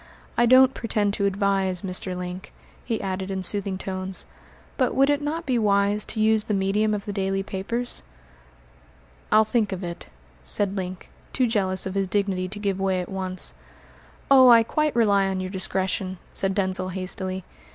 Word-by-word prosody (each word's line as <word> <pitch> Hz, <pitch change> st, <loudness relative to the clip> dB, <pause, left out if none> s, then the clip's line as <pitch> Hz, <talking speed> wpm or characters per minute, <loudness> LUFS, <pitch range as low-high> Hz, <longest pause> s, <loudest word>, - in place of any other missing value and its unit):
I 240 Hz, -, +3 dB
don't 260 Hz, +1 st, +7 dB
pretend 210 Hz, -4 st, -1 dB
to 200 Hz, -1 st, +1 dB
advise, 195 Hz, -2 st, 0 dB
Mr. 185 Hz, -1 st, -4 dB
Link," 180 Hz, +1 st, -6 dB, 0.3 s
he 230 Hz, -3 st, -2 dB
added 190 Hz, 0 st, -3 dB
in 190 Hz, -1 st, -3 dB
soothing 200 Hz, 0 st, +1 dB
tones, 185 Hz, 0 st, -4 dB, 0.5 s
"but 255 Hz, -2 st, 0 dB
would 275 Hz, +2 st, +4 dB
it 290 Hz, 0 st, 0 dB
not 315 Hz, +3 st, -3 dB
be 255 Hz, -4 st, +1 dB
wise 205 Hz, 0 st, +2 dB
to 220 Hz, -, -5 dB
use 220 Hz, 0 st, +3 dB
the 210 Hz, -, 0 dB
medium 205 Hz, +2 st, +1 dB
of 200 Hz, -, -5 dB
the 205 Hz, -, -4 dB
daily 195 Hz, 0 st, -1 dB
papers?" 230 Hz, +6 st, -2 dB, 1.3 s
"I'll 215 Hz, +1 st, +6 dB
think 220 Hz, -1 st, 0 dB
of 190 Hz, 0 st, -4 dB
it," 170 Hz, 0 st, -6 dB, 0.3 s
said 200 Hz, -1 st, +1 dB
Link, 185 Hz, -1 st, -6 dB, 0.2 s
too 255 Hz, -, +2 dB
jealous 190 Hz, -5 st, 0 dB
of 190 Hz, -, -4 dB
his 195 Hz, -1 st, 0 dB
dignity 195 Hz, -2 st, 0 dB
to 200 Hz, +3 st, -7 dB
give 200 Hz, -2 st, -2 dB
way 190 Hz, -1 st, +1 dB
at 180 Hz, -, -5 dB
once. 185 Hz, -1 st, -1 dB, 0.8 s
"Oh, 260 Hz, -2 st, +8 dB
I 230 Hz, -1 st, +8 dB
quite 305 Hz, +5 st, 0 dB
rely 200 Hz, -4 st, +3 dB
on 190 Hz, -1 st, -2 dB
your 185 Hz, 0 st, -4 dB
discretion," 190 Hz, 0 st, -2 dB, 0.2 s
said 195 Hz, 0 st, 0 dB
Denzil 185 Hz, -1 st, -1 dB
hastily. 185 Hz, 0 st, -4 dB
195 Hz, 175 wpm, -24 LUFS, 190-215 Hz, 1.3 s, Oh